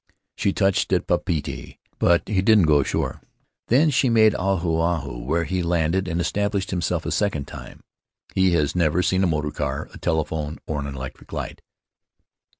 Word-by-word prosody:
She 100 - +1
touched 95 -1 +1
at - - +1
Papeete, 80 -4 -2 0.2
but 85 0 +3
he 100 -3 +1
didn't 105 0 +5
go 75 -2 +4
ashore. 70 - -2 0.5
Then 150 +6 +4
she 130 -1 +2
made 110 -2 +5
Ahu 90 -3 0
Ahu, 80 -8 -1
where 80 +8 0
he 95 +2 -2
landed 85 +2 0
and 85 -1 -2
established 100 +2 -1
himself 90 -3 -1
a - - -2
second 95 -10 0
time. - - -11 0.5
He 95 -1 +3
has 75 -3 +1
never 85 0 +2
seen 95 +1 +2
a - - +3
motor 75 -2 -1
car, 70 -2 -3
a - - -11
telephone, 80 -1 -2
or 75 -2 -3
an 70 - -4
electric 65 -2 -8
light." - - -5
85 Hz, 170 wpm, -23 LUFS, 75-95 Hz, 0.5 s, didn't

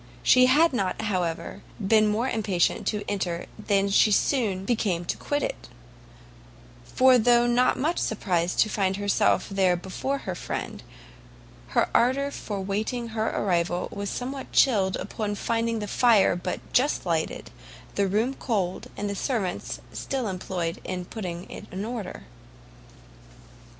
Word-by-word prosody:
She 255 0 +6
had 300 +4 +4
not, 195 -6 -1
however, 175 -5 -2 0.2
been 215 +1 +4
more 220 +4 0
impatient 205 -8 0
to 210 -1 -1
enter 180 -4 -2
than 200 -2 +1
she 210 +2 +5
soon 205 -4 +1
became 195 -7 0
to - - -1
quit 290 0 -2
it; - - -5 1.1
for 255 - +4
though 240 +1 +4
not 245 +1 +3
much 320 +6 0
surprized 180 -5 -1
to - - +4
find 195 -2 0
herself 205 -1 +2
there 190 -2 +2
before 190 +10 -3
her 185 - -2
friend, - - -5 1.0
her - - +4
ardour 275 +4 +2
for 205 -7 -5
waiting 220 +5 -2
her 220 0 -1
arrival 175 -2 0
was 200 0 -4
somewhat 265 +2 -5
chilled, 195 -8 +3
upon 210 -2 -3
finding 230 +2 -1
the 210 -1 -4
fire 220 -4 +4
but 180 +1 -4
just 275 -2 +2
lighted, 165 -2 -2 0.4
the 200 -1 +1
room 220 +7 +1
cold, 200 -9 -2
and 205 - -2
the 200 - -2
servants 200 -5 -2
still 265 -4 -3
employed 180 -3 -3
in 180 -1 -4
putting 180 -4 -6
it - - -9
in 190 +3 -4
order. 230 -3 -6
205 Hz, 145 wpm, -26 LUFS, 185-240 Hz, 1.1 s, She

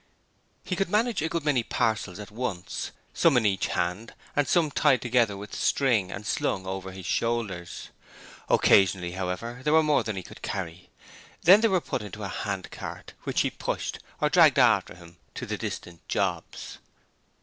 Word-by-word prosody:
He 185 - -2
could 195 0 -1
manage 225 0 +1
a 160 - -1
good 165 -2 -3
many 140 -5 +3
parcels 105 -5 -1
at 105 -1 -9
once: 110 -6 -4 0.2
some 160 -6 +4
in 115 - +2
each 95 -2 +1
hand 90 +6 -2 0.2
and 145 -2 +2
some 165 -4 +2
tied 140 -3 +3
together 120 -4 +1
with 100 0 -9
string 115 -9 +1
and 100 +2 -7
slung 95 -2 -1
over 95 0 -5
his 95 -1 -9
shoulders. 105 -6 -2 0.6
Occasionally, 95 -2 +4
however, 95 +7 -4
there 150 - +2
were 160 0 +6
more 150 -1 +3
than 110 -3 -4
he 95 - -5
could - - -13
carry; 90 -2 -5 0.5
then 190 +5 +8
they 225 - +5
were 190 -4 +2
put - - -3
into 105 0 -8
a 100 - -3
handcart 100 -1 -5
which - - +1
he - - 0
pushed - - -3 0.2
or - - +2
dragged - - +6
after - - +4
him 85 -1 -15 0.2
to - - -5
the - - -3
distant 85 -2 -7
jobs. - - -3
105 Hz, 175 wpm, -27 LUFS, 95-140 Hz, 0.6 s, then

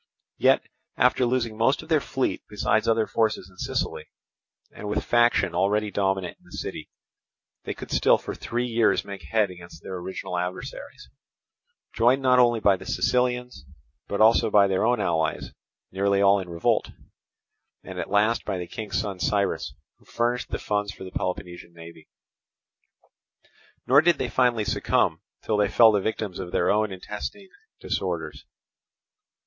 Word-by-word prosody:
Yet - - +4 0.3
after 125 +1 +3
losing 120 -3 -1
most 115 +7 +1
of 155 - -16
their 155 -3 +3
fleet 135 0 -2
besides 105 +1 0
other 115 -1 +3
forces 105 -5 -1
in 90 - -22
Sicily, - - -3 0.6
and 105 - -7
with 105 - -1
faction 120 -6 +3
already 100 +4 +1
dominant 95 -2 -1
in - - -28
the - - -10
city, - - -6 0.8
they - - -4
could - - -9
still - - +4
for - - -7
three 120 +1 -3
years 115 -2 +2
make 100 -2 -8
head 100 +5 0
against 85 -1 -13
their 95 - -6
original 90 0 -5
adversaries, 90 +1 -6 0.9
joined 125 +4 +3
not 125 -1 +5
only 120 -2 +4
by 100 -3 +3
the - - -12
Sicilians, 125 - 0 0.4
but 100 - -3
also 115 +1 +5
by 100 -1 +5
their 95 -1 0
own 120 0 +2
allies 80 -2 -1 0.4
nearly 100 +1 +1
all 100 0 +5
in 95 -2 -7
revolt, 85 -1 0 0.9
and - - -8
at - - -4
last 105 +3 +2
by 95 - -3
the 90 - -4
King's 110 +4 -4
son, 100 -4 -4
Cyrus, 100 -10 -1 0.2
who - - -26
furnished 120 +1 -1
the - - -2
funds 105 -1 -2
for 100 - -11
the 95 - -8
Peloponnesian 90 -2 -5
navy. 85 -1 -13 1.8
Nor 140 +3 +6
did 175 +2 +3
they 125 - -2
finally 120 -4 +2
succumb - - +1 0.2
till 110 - 0
they 105 -1 +2
fell 115 -2 +6
the 105 -2 +1
victims 105 -3 -3
of 90 -2 -6
their - - +2
own 105 0 +1
intestine 105 - -7 0.3
disorders. - - -4
105 Hz, 160 wpm, -25 LUFS, 95-120 Hz, 1.8 s, Nor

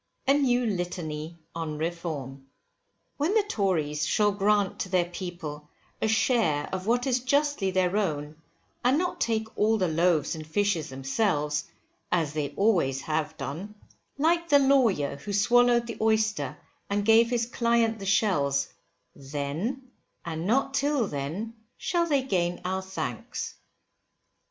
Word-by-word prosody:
A 275 - +6
NEW 250 -4 +2
LITANY 170 -5 -3 0.2
ON 160 -2 -4
REFORM. 150 -5 -4 0.7
When 315 +9 +1
the 435 - +4
Tories 165 - 0
shall 210 -1 +3
grant 205 0 +1
to 185 - -3
the 180 -1 +2
people 160 -5 -6 0.3
a - - +2
share 220 - +2
of 190 +1 -3
what 245 +2 +2
is 255 -2 +2
justly 280 -4 +1
their 185 0 +1
own, 155 -7 -1 0.5
and 255 +3 +4
not 360 +2 -2
take 220 -1 -1
all 220 +1 +3
the 185 -3 +1
loaves 165 -1 +2
and 155 -2 -7
fishes 170 -2 0
themselves, 150 +2 0 0.5
as 160 -5 +1
they 150 -2 -1
always 170 -11 +2
have 155 +1 -2
done; 190 +9 -6 0.4
like 335 +3 +2
the 290 - +7
lawyer 245 - +3
who 200 +8 -6
swallowed 240 +3 +4
the 235 - -6
oyster 215 -10 +1 0.3
and 200 0 0
gave 225 +1 +6
his 240 -1 +1
client 235 -1 +1
the 195 - -6
shells; 150 -9 +2 0.5
then, 150 - -4 0.3
and 165 +1 -3
not 270 +4 +2
till 280 -3 +1
then, 165 +9 -4 0.2
shall 345 -1 0
they 285 -4 +2
gain 175 -8 0
our 190 +1 -1
thanks. 160 - -5
195 Hz, 140 wpm, -27 LUFS, 155-235 Hz, 0.7 s, the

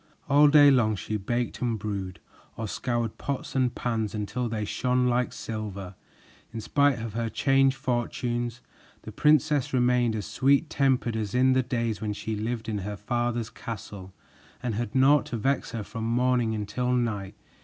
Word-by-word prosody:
All 145 +2 +6
day 145 -1 +7
long 115 -5 +3
she 110 +2 -4
baked 120 +4 -2
and 120 -3 0
brewed, 100 -3 -5 0.4
or 110 - -3
scoured 120 0 -2
pots 140 -2 -4
and 130 -2 +1
pans 110 -3 -2
until 105 +4 -2
they 110 -1 -2
shone 125 +4 0
like 125 0 +1
silver. 100 -4 -6 0.6
In 115 - -5
spite 140 +4 +2
of 115 -2 -5
her 115 0 -2
changed 135 +3 +3
fortunes, 120 0 -2 0.4
the 110 - -8
princess 150 +2 +2
remained 125 -2 +2
as 105 -4 -3
sweet 140 - +2
tempered 130 -4 +1
as 110 -1 -3
in 130 +1 +4
the 130 - +3
days 115 -4 -2
when 105 -1 -2
she 110 +1 -4
lived 110 +2 -3
in 105 -2 -2
her 100 +2 -5
father's 120 +2 -2
castle 100 -4 -8 0.5
and 120 -2 -1
had 110 +1 -3
naught 140 +3 +5
to 125 -5 -3
vex 135 +5 0
her 115 -3 -4
from 110 +2 -6
morning 120 -1 +1
until 110 +4 -2
night. 105 -5 -1
120 Hz, 170 wpm, -27 LUFS, 110-125 Hz, 0.6 s, day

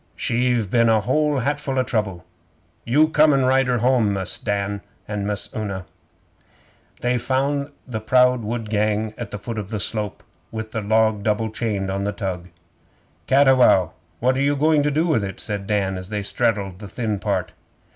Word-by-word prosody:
She've 120 -2 +1
been 115 -1 +4
a 110 -1 +4
whole 150 +6 +1
hatful 140 +1 -1
o' 130 - +3
trouble. 105 -7 -2 0.6
You 150 +6 +4
come 155 -2 +5
an' 135 -1 +2
ride 130 0 +3
her 125 -1 +2
home, 120 -3 +2
Mus' 95 -2 -4
Dan 100 -1 -2 0.3
and 105 -1 -3
Miss 105 -1 -2
Una!' 100 -4 -4 1.2
'They 125 0 +1
found 140 +3 0 0.2
the 115 -4 -3
proud 125 +3 +3
wood 110 0 -4
gang 105 0 0
at 120 -3 -6
the 105 - -5
foot 115 +1 -5
of 100 -2 -6
the 110 -2 -3
slope, 105 0 -3 0.3
with 110 0 -5
the 110 - -2
log 110 0 +2
double 110 +1 0
chained 105 -4 -2
on 100 +1 -2
the 100 - -1
tug. 95 -3 -4 0.8
'Cattiwow, 130 - +5 0.3
what 130 +2 +2
are - - +1
you 145 +1 +2
going 150 +1 +3
to 145 - +1
do 155 +3 +1
with 150 -11 +1
it?' 95 -1 -5
said 100 -3 -4
Dan, 95 -3 0
as 90 +1 -9
they 105 -1 -3
straddled 100 -4 0
the 105 - -8
thin 110 -1 -3
part. 100 -3 -1
110 Hz, 185 wpm, -22 LUFS, 100-130 Hz, 1.2 s, come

